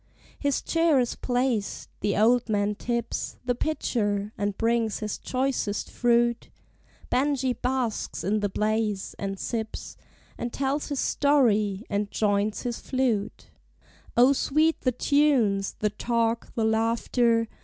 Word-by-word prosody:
His 285 -2 0
chair 330 -4 +3
is 245 -2 0
placed; 245 -4 -1
the 205 - 0
old 235 +2 +3
man 205 -1 +1
tips 235 +2 -3
The 250 - +2
pitcher, 215 -7 -1
and 205 -1 -2
brings 230 -2 +1
his 215 -1 -4
choicest 255 -5 -2
fruit; 235 0 +2 0.6
Benjie 265 -1 +1
basks 250 -3 -2
in 210 +3 +1
the 205 -1 0
blaze, 210 -1 -1
and 195 -1 -3
sips, 220 +1 -5 0.4
And 240 - -3
tells 275 +3 -1
his 285 -3 -3
story, 220 -8 +2
and 205 0 -1
joints 205 0 0
his 240 -1 -3
flute: 230 -5 -2 0.7
O, 250 +3 +7
sweet 310 +4 +1
the 255 - +2
tunes, 250 -8 +2
the 210 -1 0
talk, 230 +1 -1
the 225 - +1
laughter! 230 +1 +2
230 Hz, 130 wpm, -26 LUFS, 210-255 Hz, 0.7 s, O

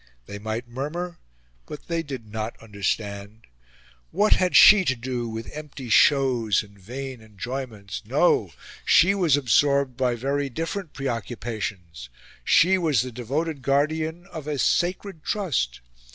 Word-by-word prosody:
They 100 - -8
might 110 +3 -4
murmur, 160 +8 -5 0.5
but 150 - -9
they 170 -1 -1
did 135 -7 -7
not 110 +1 -5
understand. 100 0 -4 0.6
What 205 +5 +3
had 185 -1 +1
she 210 -2 +9
to 130 - +1
do 120 -1 -4
with 110 0 -6
empty 145 -4 -8
shows 125 -6 +4
and 100 -1 -18
vain 130 +5 -7
enjoyments? 110 -1 -6
No! - - +2 0.3
She 190 +4 +5
was 175 -8 +3
absorbed 140 0 +2
by 125 -2 +1
very 140 +3 -1
different 165 +5 -4
preoccupations. 110 - -5 0.3
She 185 - +4
was 150 -9 +2
the 130 - -6
devoted 140 +6 -3
guardian 155 +5 0
of 155 -3 -7
a 150 -1 -2
sacred 175 +3 0
trust. 125 - -1
130 Hz, 135 wpm, -24 LUFS, 110-155 Hz, 0.6 s, she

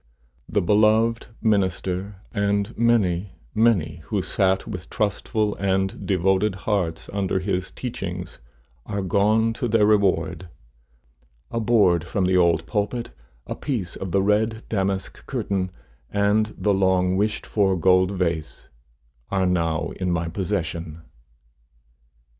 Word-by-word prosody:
The - - +1
beloved 110 +4 +3 0.2
minister, 95 -2 0 0.2
and 100 +1 0
many, 100 -6 +2 0.2
many 100 -9 +2
who 100 -4 -1
sat 95 -1 +1
with 90 -6 -7
trustful 105 0 -1
and 95 -1 -1
devoted 95 +2 +2
hearts 90 -7 -1
under 95 -2 0
his 95 -1 -1
teachings, 90 -7 -6 0.5
are 100 -1 -2
gone 105 +4 +2
to 120 +1 -2
their 110 -2 +3
reward. 100 -3 +1 1.0
A 115 - -1
board 105 -7 +3
from 95 +1 -1
the 95 0 +2
old 85 -2 +3
pulpit, 105 - -2 0.3
a - - -4
piece 110 - -3
of 95 -2 -5
the 95 +1 +2
red 110 +2 +1
damask 95 -2 -2
curtain, 95 -2 -1 0.4
and 105 +1 +1
the 105 - +1
long 95 -1 +2
wished 105 +2 0
for 95 -3 +1
gold 95 +1 +4
vase, 85 -5 -3 0.6
are 95 -1 +1
now 85 -3 0
in 90 -1 -1
my 85 -1 0
possession. 85 -3 -3
95 Hz, 125 wpm, -23 LUFS, 90-105 Hz, 1.0 s, gold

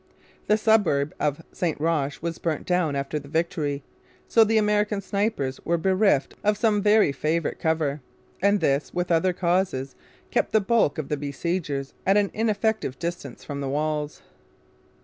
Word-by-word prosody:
The 210 - +4
suburb 205 -10 +2
of 150 +2 -1
St 170 -5 -2
Roch 150 -2 -1
was 170 -1 -3
burnt 160 -3 -2
down 180 -5 +1
after 140 +2 -2
the 140 - -13
victory; 150 -3 -1 0.4
so 225 - +5
the 220 +1 +2
American 210 -1 +2
snipers 200 -9 -2
were 170 - +1
bereft 190 -3 +2
of 210 0 +2
some 210 -2 +2
very 210 -5 +4
favourite 155 +3 -1
cover, 155 -3 0 0.4
and 200 0 +3
this, 140 0 0
with 175 0 -1
other 170 +3 +3
causes, 175 -7 0 0.4
kept - - 0
the 220 - +6
bulk 215 -6 +2
of 155 -3 -4
the 150 - 0
besiegers 145 0 -3
at 195 +2 +3
an 205 -1 +2
ineffective 220 - 0
distance 170 -6 -5
from 140 -1 -5
the 135 - -2
walls. 150 +1 -2
170 Hz, 160 wpm, -25 LUFS, 145-205 Hz, 0.4 s, the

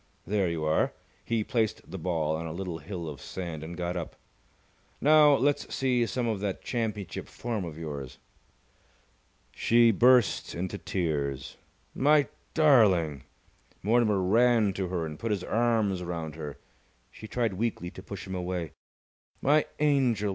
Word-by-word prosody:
There 100 -3 +1
you 85 -2 -3
are!" 80 0 +1 0.3
He 115 -2 0
placed 110 -3 -1
the 95 - -5
ball 80 -3 0
on 80 +1 -4
a - - -5
little 90 -2 -4
hill 85 +1 -6
of 70 -4 -7
sand, 85 -4 -6
and 85 +2 -7
got 90 0 -2
up. 85 -3 -5 0.8
"Now 150 0 +6
let's 145 +2 0
see 125 -3 +1
some 125 0 -1
of 110 -3 -1
that 100 -1 -3
championship 110 -8 -3
form 115 -4 -4
of 80 -2 -7
yours!" 70 -5 -6 1.3
She 115 - +4
burst 120 0 +3
into 95 +3 -4
tears. 70 -6 -2 0.4
"My 145 +1 +4 0.3
darling!" 100 - +4 0.6
Mortimer 105 -2 +3
ran 110 +1 +4
to 95 0 -2
her 90 -2 -2
and 75 -1 -7
put 115 - -3
his 100 -4 -1
arms 110 -5 +1
round 85 -3 -4
her. 75 -2 -7 0.5
She 110 - -10
tried 115 -3 -1
weakly 95 -3 -2
to - - -10
push 95 -3 -8
him 95 - -6
away. 90 -3 -3 0.7
"My 150 +3 +3
angel! 130 -8 +2
95 Hz, 150 wpm, -28 LUFS, 85-120 Hz, 1.3 s, Now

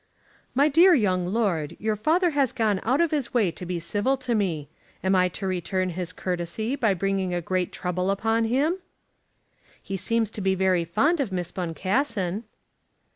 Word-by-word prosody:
"My 280 +3 +5
dear 340 +5 +6
young 185 -7 +1
lord, 180 -7 -1
your 215 0 0
father 330 - +2
has 280 -4 +2
gone 215 -5 +1
out 255 +5 +1
of 335 - +2
his 280 -6 -2
way 210 -8 +3
to 170 +2 -8
be 175 -1 -2
civil 205 +10 0
to 255 -2 -2
me. 175 -9 -1 0.4
Am 190 +1 +2
I 185 -1 +4
to 195 +2 -6
return 185 0 -1
his 180 0 -4
courtesy 180 +8 -3
by 225 -8 +2
bringing 190 -1 -1
a - - 0
great 180 +1 -1
trouble 180 +1 -2
upon 225 +3 +1
him?" 285 +10 +1 1.0
"He 195 - -5
seems 225 +2 0
to 210 - -6
be 190 0 +2
very 185 -2 +2
fond 295 - +2
of 255 -8 -1
Miss 180 -2 -3
Boncassen." 190 - -1
195 Hz, 180 wpm, -25 LUFS, 180-240 Hz, 1.0 s, dear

